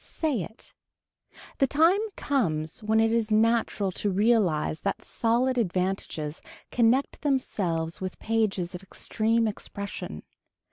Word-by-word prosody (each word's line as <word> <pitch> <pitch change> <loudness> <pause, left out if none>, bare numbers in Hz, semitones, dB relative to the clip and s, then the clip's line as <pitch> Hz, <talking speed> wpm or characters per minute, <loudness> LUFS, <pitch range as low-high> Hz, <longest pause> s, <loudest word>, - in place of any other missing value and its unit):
Say 295 - -1
it. 220 +7 -9 0.9
The 270 - +4
time 325 +8 +4 0.2
comes 165 - -1
when 220 +1 +2
it 225 0 +3
is 230 -1 +1
natural 220 -2 +2
to 205 - -1
realize 190 -7 +2
that 195 - -2
solid 245 +2 +1
advantages 180 -6 -2 0.3
connect 245 +3 +2
themselves 185 - -1
with 185 -1 -4
pages 210 -5 0
of 180 - -6
extreme 225 +3 0
expression. 200 - -6
215 Hz, 120 wpm, -27 LUFS, 185-235 Hz, 0.9 s, The